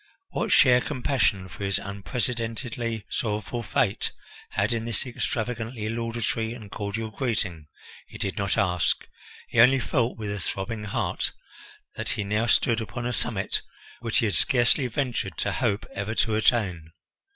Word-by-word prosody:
What - - -1
share 125 -2 +7
compassion 125 -9 +1
for 100 - -8
his 100 0 +1
unprecedentedly 115 +3 -3
sorrowful 110 +2 -2
fate 110 - +1 0.4
had - - +1
in 115 -1 -2
this 115 0 -1
extravagantly 115 -2 -2
laudatory 115 0 -1
and 105 -4 -10
cordial 110 +2 -3
greeting, 105 - -2 0.4
he - - -10
did 95 - -2
not 100 -3 0
ask; 90 -3 +2 0.4
he 115 - 0
only 130 +3 +8
felt 120 0 0
with 105 -2 -3
a 105 - -3
throbbing 105 +4 -3
heart 100 - -1 0.6
that - - -4
he 105 - 0
now 105 +3 +1
stood 115 0 +4
upon 120 +2 -4
a 125 - 0
summit 105 -3 0 0.4
which 115 -1 0
he 120 - +4
had 105 - +1
scarcely 125 - +4
ventured 125 -1 -2
to - - 0
hope 100 - 0
ever 100 +3 -3
to 110 - +2
attain. 95 -8 +2
115 Hz, 150 wpm, -26 LUFS, 100-120 Hz, 0.6 s, only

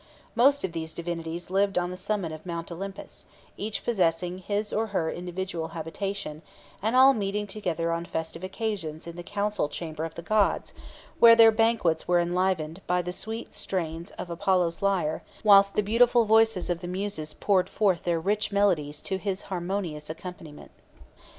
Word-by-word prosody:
Most 280 +4 +4
of 185 - -1
these 160 -1 -5
divinities 170 +1 -5
lived 195 0 +2
on 180 0 0
the - - -5
summit 185 -2 -2
of 155 0 -8
Mount 170 -1 -5
Olympus, 195 +3 -6 0.3
each 210 +1 -4
possessing 180 -4 +1
his 205 +3 -2
or 220 +1 0
her 175 -6 -1
individual 175 -1 -4
habitation, 165 -1 -4 0.4
and 220 +4 0
all 265 +1 +8
meeting 205 -1 -2
together 175 -5 -2
on 170 0 -2
festive 160 0 -5
occasions 185 -6 -4
in 170 0 -8
the 175 - -6
council 205 -3 -1
chamber 160 -1 -5
of 165 0 -5
the 170 - -7
gods, 215 +1 +1 0.5
where 230 -1 +9
their 225 -1 +8
banquets 220 -8 +2
were 175 0 +4
enlivened 175 -1 0
by 180 0 +1
the 180 +1 -4
sweet 225 +4 -6
strains 170 -2 -3
of 175 - -6
Apollo's 175 -1 +1
lyre, 185 -6 +1 0.2
whilst 200 -1 +6
the 210 - +2
beautiful 235 +3 +4
voices 220 -4 +3
of 170 -1 -2
the 175 - -5
Muses 180 -4 -4
poured 190 -2 +2
forth 195 -6 +1
their 170 -1 0
rich 210 +6 0
melodies 170 -8 +1
to 190 - -2
his 195 -1 -3
harmonious 175 -4 -3
accompaniment. 160 -2 -9
185 Hz, 170 wpm, -27 LUFS, 165-205 Hz, 0.5 s, where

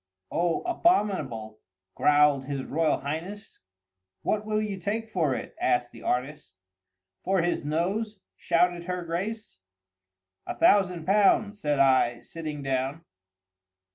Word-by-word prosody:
"Oh, 170 -1 0
abominable!" 185 - 0 0.3
growled 145 -2 +4
his 140 -1 -3
Royal 155 +3 0
Highness. 165 +9 -6 0.6
"What 215 0 -1
will 215 0 +1
you 205 -3 -3
take 220 +4 -3
for 155 -9 +1
it?" - - -7
asked 125 -1 +1
the - - -13
artist. 125 -6 -3 0.7
"For 190 -3 +1
his 175 - -1
nose!" 190 +8 -2 0.2
shouted 175 0 +1
her 180 -1 -3
Grace. 185 - -4 0.9
"A - - -3
thousand 185 - +3
pounds," 205 +2 +3
said 150 -1 +1
I, 130 -3 +3
sitting 155 -3 -7
down. 135 +4 -2
170 Hz, 120 wpm, -27 LUFS, 140-205 Hz, 0.9 s, growled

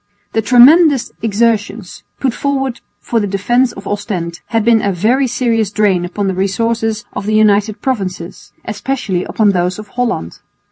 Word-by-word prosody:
The 225 - +1
tremendous 270 +5 +5
exertions 215 -2 -1 0.2
put 260 -4 0
forward 270 -3 -2 0.2
for 235 - -1
the 205 - -1
defence 240 +6 +1
of 195 - -11
Ostend 190 -5 -4
had 225 -2 0
been 230 -2 +4
a 200 - 0
very 235 +9 +1
serious 230 -4 0
drain 200 -4 +1
upon 195 +3 -3
the 190 - 0
resources 220 +3 -1
of 200 - -5
the 215 - +1
United 210 0 +2
Provinces, 190 -8 -4
especially 210 -4 -3
upon 210 -2 +2
those 180 -1 -1
of 215 -1 -10
Holland. 235 - -3
215 Hz, 155 wpm, -15 LUFS, 195-240 Hz, 0.2 s, tremendous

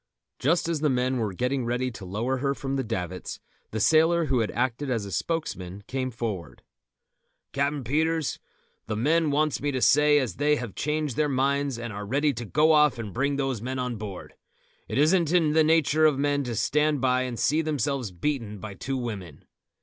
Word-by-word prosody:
Just 165 +5 +2
as 165 -2 -1
the 150 0 +2
men 130 0 +1
were 110 -4 -1
getting 125 +7 -1
ready 125 +2 -1
to 105 -4 -9
lower 115 +8 -1
her 140 +1 -1
from 135 0 -3
the 135 - 0
davits, 95 -6 -4 0.3
the 110 - -3
sailor 160 +6 +4
who 130 -4 +1
had 110 - 0
acted 130 +3 -1
as 105 -7 -2
spokesman 100 - -3
came 130 -1 -2
forward. 110 -7 -5 0.9
"Captain 140 0 0
Peters, 160 +4 0 0.5
the 110 - -2
men 155 +8 +2
wants 150 +1 +1
me 145 0 0
to 130 - -1
say 150 +3 +5
as 130 -10 -1
they 150 +1 +3
have 125 -8 -5
changed 150 -3 -2
their 150 -1 +2
minds 140 0 0
and 120 -2 -6
are 105 0 -6
ready 145 +5 +1
to 120 0 -6
go 155 +8 +3
off 150 -4 +4
and 110 -5 -6
bring 140 +3 0
those 135 -5 -1
men 130 +2 -3
on 125 -2 -2
board. 100 -3 -8 0.5
It - - -3
isn't 160 +2 +3
in 165 -4 +3
nature 155 0 +4
for 135 - -5
men 145 0 +1
to 120 -2 -3
stand 150 +5 +1
by 130 0 +2
and 125 -2 -3
see 155 +7 +2
themselves 140 -6 -1
beaten 105 +3 -3
by 105 +1 -7
two 135 +7 -4
women." 100 - -6
135 Hz, 195 wpm, -26 LUFS, 115-150 Hz, 0.9 s, say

